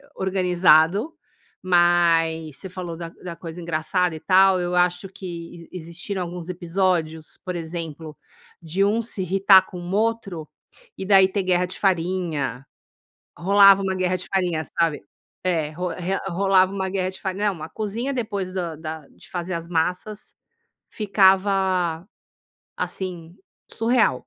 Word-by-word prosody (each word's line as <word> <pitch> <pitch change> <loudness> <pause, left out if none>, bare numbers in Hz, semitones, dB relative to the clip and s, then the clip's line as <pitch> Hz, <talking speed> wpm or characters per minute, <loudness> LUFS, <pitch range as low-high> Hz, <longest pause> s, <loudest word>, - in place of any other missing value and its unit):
organizado, 185 - +3 0.5
mas 170 -3 +2
você 190 - -8
falou 180 -3 -6
da 165 0 -7
da 170 0 -9
coisa 170 +1 -8
engraçada 170 +1 -1
e - - -7
tal. 190 +2 +5
Eu 175 0 -2
acho 180 +1 +1
que 170 -3 -9
existiram 180 +3 -5
alguns 175 -1 -7
episódios, 170 -3 -1
por 180 -1 -4
exemplo, 160 -2 -6 0.4
de 175 +4 0
um 220 +3 +1
se 215 -4 -3
irritar 190 +1 +5
com 180 - -10
o 175 +1 -7
outro 210 -7 -1 0.5
e, 190 - -5
daí, 190 -1 +6
ter 195 0 -2
guerra 180 0 +2
de 180 - -8
farinha. 165 - -1 0.7
Rolava 195 +1 +6
uma 190 -1 -1
guerra 185 0 0
de 180 - -9
farinha, 175 -4 0 0.2
sabe? 165 -3 +1 0.4
É, 160 -4 0
ro 180 +3 -3
re 180 +2 -3
rolava 190 +1 +3
uma 190 -1 -2
guerra 185 -1 -1
de 190 - -12
farinha. 200 +2 -1
Não, 165 - -11
a 160 - -7
cozinha, 225 +6 -3
depois 205 -6 -3
do 170 -4 -3
da 160 0 -6
de - - -17
fazer 180 +1 -4
as 165 0 -5
massas, 180 +5 -2 0.6
ficava, 190 -4 +2 0.7
assim, 175 -3 -5 0.4
surreal. 230 - +2
180 Hz, 145 wpm, -23 LUFS, 165-195 Hz, 0.7 s, daí